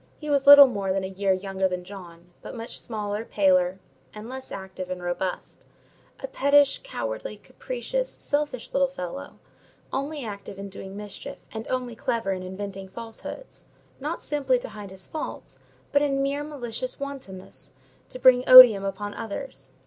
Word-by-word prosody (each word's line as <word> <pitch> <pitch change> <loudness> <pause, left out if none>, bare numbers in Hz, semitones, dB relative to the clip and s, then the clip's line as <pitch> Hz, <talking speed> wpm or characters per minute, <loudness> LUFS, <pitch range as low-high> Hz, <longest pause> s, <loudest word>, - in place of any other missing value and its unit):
He 300 -1 -5
was 280 -1 +1
little 285 0 +12
more 200 -7 -2
than 190 0 0
a - - -2
year 195 0 0
younger 190 0 0
than 180 -1 -4
John, 175 -2 -12
but - - -9
much 230 0 -6
smaller, 210 -1 -4
paler, 185 -4 +2 0.4
and 210 +1 -8
less 260 +1 -8
active 190 -1 -7
and 180 -1 -5
robust; 175 +1 -4 0.6
a - - -2
pettish, 285 - +3
cowardly, - - -5
capricious, - - -4
selfish 290 -4 -3
little 275 0 +3
fellow, 180 - -7 0.6
only 280 0 -3
active 200 -2 -8
in 200 0 -7
doing 195 0 -9
mischief, 205 -1 -8
and 220 0 -6
only 250 -2 -3
clever 230 -3 -1
in 185 -1 -3
inventing 195 +1 -7
falsehoods: 230 - -9 0.3
not 300 +5 -4
simply 275 -4 +1
to 245 - -7
hide 205 -2 -9
his 190 -1 -9
faults, 310 - -7 0.3
but, 285 - +3
in 275 -2 +1
mere 280 +1 -1
malicious 255 -4 -5
wantonness, 265 -10 -9 0.4
to - - -8
bring 255 0 +6
odium 250 -6 +11
upon 200 +1 -4
others. 225 - -7
225 Hz, 160 wpm, -25 LUFS, 190-275 Hz, 0.6 s, little